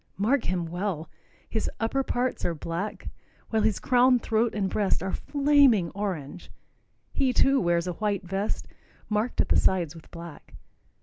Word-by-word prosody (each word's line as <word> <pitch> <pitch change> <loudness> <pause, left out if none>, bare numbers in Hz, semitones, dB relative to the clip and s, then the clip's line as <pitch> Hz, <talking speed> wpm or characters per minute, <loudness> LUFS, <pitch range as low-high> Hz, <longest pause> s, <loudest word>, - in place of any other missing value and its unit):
Mark 230 +7 +1
him 180 -1 -1
well. 175 -2 -4 0.4
His 220 - -2
upper 230 +4 0
parts 255 -1 -2
are 170 - 0
black, 170 +7 -4 0.4
while 220 -1 +2
his 215 -2 +2
crown, 250 0 +4
throat 225 -1 0
and 200 -2 0
breast 200 -1 0
are 190 - -2
flaming 280 - +3
orange. 180 -5 -5 0.6
He, 265 -2 +1
too, 270 +1 +4
wears 170 -1 +1
a 180 - -2
white 205 +1 -1
vest, 195 +3 -3 0.4
marked 215 +3 +1
at - - -3
the - - +4
sides 175 -5 +2
with 165 -2 -14
black. 170 -2 -11
205 Hz, 160 wpm, -27 LUFS, 175-240 Hz, 0.6 s, crown